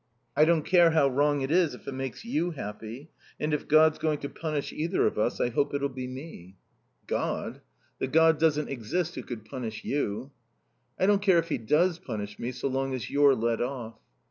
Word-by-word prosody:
I 155 - +6
don't 165 -1 +3
care 175 -2 +6
how 160 -4 +4
wrong 145 +2 +2
it 135 +2 -2
is 170 -3 +3
if - - -17
it - - -3
makes 135 - -5
you 175 -7 0
happy. 120 0 -7 0.3
And 150 0 -1
if 150 - -2
God's 155 0 +5
going 155 -2 0
to 140 - -4
punish 155 -3 -4
either 170 +4 0
of - - 0
us 115 +3 0
I 120 - +2
hope 140 +4 0
it'll 140 0 0
be 130 -1 -6
me." 130 - -9 0.5
"God? - - -3 0.4
The - - -1
God 160 +2 +4
doesn't 150 -2 +2
exist 155 +8 -2
who - - -5
could 110 -4 -8
punish 115 -5 -6
you." 135 -1 -2 0.7
"I - - +2
don't 200 0 +3
care 190 -4 +4
if 165 0 0
he 150 - -1
does 165 +9 +2
punish 105 - -6
me 120 - -3
so 130 +2 -3
long 135 0 -1
as 120 -5 -6
you're 140 -1 +5
let 115 0 0
off." 120 -3 -4
140 Hz, 205 wpm, -28 LUFS, 125-160 Hz, 0.7 s, I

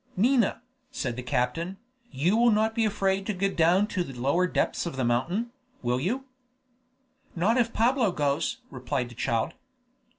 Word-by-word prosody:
"Nina," 235 +1 +2 0.3
said 125 -4 -3
the 125 - -4
captain, 135 +9 -1 0.3
"you 165 +10 +1
will 240 +1 +5
not 220 0 +2
be 225 -1 +1
afraid 195 -2 0
to 210 - -1
go 195 +2 0
down 175 +4 +3
to 185 - -1
the 135 -6 -9
lower 155 +9 +2
depths 180 - -1
of 165 - -5
the 130 -2 -1
mountain, 175 - 0 0.3
will 125 +1 +1
you?" 240 - -2 1.1
"Not 190 +7 +2
if 235 -2 +2
Pablo 235 -2 +2
goes," 145 -1 -1
replied 125 -1 -3
the - - -11
child. 115 -1 -1
180 Hz, 165 wpm, -27 LUFS, 130-220 Hz, 1.1 s, will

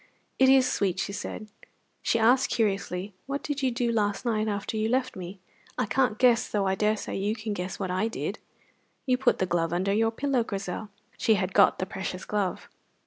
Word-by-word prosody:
"It 265 0 +6
is 265 -1 +6
sweet," 195 -7 0
she 200 - -2
said. 215 +1 -6 0.5
She - - +1
asked 245 +3 +4
curiously: 195 -3 -1
"What 280 +1 -3
did 290 -1 -3
you 260 - +2
do 240 -1 0
last 205 -1 0
night, 220 -2 +1
after 205 +1 -3
you 220 0 0
left 255 +1 0
me? 185 +1 -7 0.4
I - - +1
can't 250 -1 +1
guess, 245 -2 +4
though 205 -2 0
I 190 - +2
daresay 210 +2 0
you 205 +3 0
can 215 -1 -4
guess 180 -1 -4
what 190 -2 -3
I 185 +4 +1
did." 225 - -4 0.7
"You 255 -1 +2
put 260 -2 +3
the 185 - +1
glove 170 -2 0
under 185 +3 0
your 225 +2 +3
pillow, 260 +1 0
Grizel." 200 0 -5 0.3
(She 220 - +4
had 185 -1 -2
got - - +5
the 185 - -2
precious 185 -1 -5
glove.) 200 -4 -2
215 Hz, 200 wpm, -27 LUFS, 190-240 Hz, 0.7 s, It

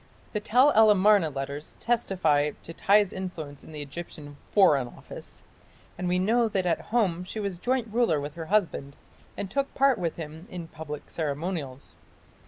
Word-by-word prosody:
The 210 - 0
Tell 250 +7 +4
el 220 -3 +6
Amarna 205 -4 +5
letters 140 +1 -6
testify 170 -11 +1
to 165 - -7
Tiy's 200 +2 +3
influence 160 -7 -6
in - - -12
the 150 -1 -5
Egyptian 145 0 -9 0.2
"Foreign 145 -11 +5
Office", - - -10 0.5
and 180 0 -3
we 180 +1 +2
know 225 +5 +3
that 195 -4 -1
at 175 - +1
home 195 -7 0
she 200 +4 -6
was 200 -4 -3
joint 250 +2 0
ruler 230 -11 +3
with 145 +1 -5
her 165 0 -7
husband 165 -9 0 0.4
and 200 - -3
took 275 +4 -1
part 270 -3 +4
with 170 -3 -2
him 160 +2 -8
in 175 -2 -6
public 150 -2 -7
ceremonials. 150 -3 -4
180 Hz, 170 wpm, -27 LUFS, 150-210 Hz, 0.5 s, el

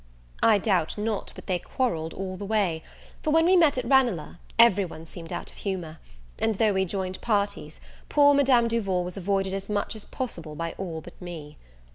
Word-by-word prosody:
I 220 -2 +6
doubt 185 -5 0
not 210 0 -2
but - - -11
they 180 -2 0
quarrelled 165 -9 -2
all 185 -1 -4
the 205 - -7
way; 195 -6 0 0.4
for - - -1
when 325 +2 +4
we 370 +2 +5
met 320 -7 +5
at 250 - -1
Ranelagh 235 - +2 0.2
every 225 -4 +6
one 165 -3 -8
seemed 165 0 -10
out - - -5
of - - -19
humour; 175 -6 -4 0.4
and 225 - +1
though 215 +1 +3
we 190 0 +1
joined 185 0 -3
parties, 205 -3 -1 0.3
poor 285 -1 +6
Madame 260 -4 +4
Duval 195 -6 0
was 180 0 -6
avoided 195 0 -1
as 195 +1 -5
much 205 +2 -1
as 215 - -8
possible 170 -12 -5
by 165 +1 -3
all 170 -4 -4
but 175 - -14
me. 160 -4 -8
195 Hz, 195 wpm, -26 LUFS, 175-230 Hz, 0.4 s, I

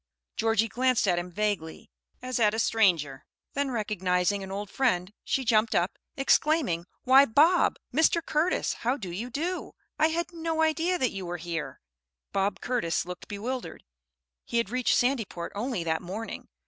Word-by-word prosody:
Georgie 225 0 +2
glanced 250 0 +1
at 175 -2 +3
him 175 +1 -5
vaguely, 200 -5 -3 0.3
as 255 -1 -2
at 215 -1 +3
a - - -3
stranger; 170 - +2 0.3
then 280 0 0
recognizing 200 -4 0
an 190 0 -7
old 205 +1 -4
friend, 195 -5 0
she 265 - -1
jumped 220 0 +3
up, 175 +3 0 0.2
exclaiming, 270 - +2 0.2
"Why 265 +2 +7
Bob 310 +9 +4 0.2
Mr. 320 +4 +4
Curtis, 315 +4 +1
how 250 +4 0
do 195 -9 -6
you 220 +8 -4
do? 335 +8 -3 0.3
I 315 - +5
had 340 +2 -2
no 325 -1 -1
idea 330 +3 +1
that 255 -8 +1
you 190 -2 -6
were 175 0 -3
here." 165 -1 -5 0.5
Bob 195 +1 0
Curtis 235 -12 -1
looked 180 0 -8
bewildered. 240 +5 -5 0.6
He 235 - -3
had 230 -3 0
reached 255 0 +2
Sandyport 230 -9 -1
only 220 -3 -2
that 160 -1 -1
morning. 200 +6 -6
225 Hz, 160 wpm, -28 LUFS, 185-270 Hz, 0.6 s, Why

